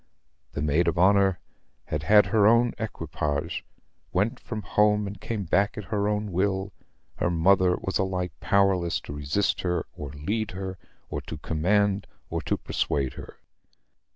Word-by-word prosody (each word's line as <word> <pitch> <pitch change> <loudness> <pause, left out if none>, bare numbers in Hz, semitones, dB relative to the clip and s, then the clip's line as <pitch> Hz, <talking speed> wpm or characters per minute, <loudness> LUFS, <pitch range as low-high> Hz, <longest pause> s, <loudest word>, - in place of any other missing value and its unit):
The 70 - -2
maid 75 +3 +2
of - - +1
honor 95 0 +4 0.5
had 75 - -3
her 105 +2 +5
own 115 +1 +4
equipage; 75 -8 -3 0.5
went 100 +5 0
from 110 -3 -6
home 105 +2 +3
and 100 -1 -7
came 110 -3 -3
back 100 +4 +1
at 105 - -4
her 100 -1 +1
own 105 -1 -1
will: 95 +2 0 0.4
her - - +1
mother 90 +2 +4
was 95 - -2
alike 95 -1 -1
powerless 95 -4 +2
to - - -8
resist 75 +8 0
her 90 -1 -1
or 75 - -6
to 70 - -11
lead 105 +8 -2
her, 95 -1 -5 0.3
or - - -3
to 80 - -7
command 95 +7 +1 0.2
or - - -1
to - - -1
persuade 70 -3 -1
her. - - -10
95 Hz, 155 wpm, -26 LUFS, 85-105 Hz, 0.5 s, her